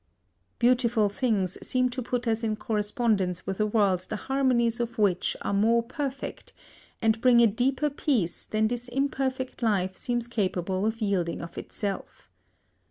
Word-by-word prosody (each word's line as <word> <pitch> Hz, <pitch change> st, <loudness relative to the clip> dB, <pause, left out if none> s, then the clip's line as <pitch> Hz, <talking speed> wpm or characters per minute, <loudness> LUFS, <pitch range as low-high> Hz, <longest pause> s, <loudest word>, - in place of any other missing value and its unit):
Beautiful 235 Hz, -3 st, +3 dB
things 205 Hz, -5 st, -1 dB
seem 255 Hz, 0 st, +1 dB
to 255 Hz, +1 st, -4 dB
put 245 Hz, 0 st, -2 dB
us 225 Hz, 0 st, 0 dB
in 215 Hz, -1 st, 0 dB
correspondence 210 Hz, -4 st, 0 dB
with 195 Hz, +1 st, -4 dB
a 215 Hz, -, +2 dB
world 205 Hz, -4 st, +2 dB
the -, -, -2 dB
harmonies 245 Hz, -2 st, +1 dB
of 235 Hz, 0 st, -3 dB
which 195 Hz, -4 st, +1 dB
are -, -, -1 dB
more 230 Hz, +4 st, +3 dB
perfect, 275 Hz, +2 st, -5 dB, 0.5 s
and 225 Hz, 0 st, +2 dB
bring 245 Hz, -1 st, +6 dB
a 235 Hz, -, +7 dB
deeper 260 Hz, +7 st, +1 dB
peace 245 Hz, -, -1 dB
than 215 Hz, 0 st, +1 dB
this 245 Hz, +1 st, -4 dB
imperfect 265 Hz, -1 st, -2 dB
life 190 Hz, -5 st, +1 dB
seems 240 Hz, +3 st, -2 dB
capable 190 Hz, -3 st, -1 dB
of 225 Hz, +1 st, -3 dB
yielding 190 Hz, -5 st, 0 dB
of 170 Hz, -, -8 dB
itself. 200 Hz, -, -5 dB
225 Hz, 155 wpm, -27 LUFS, 200-250 Hz, 0.5 s, a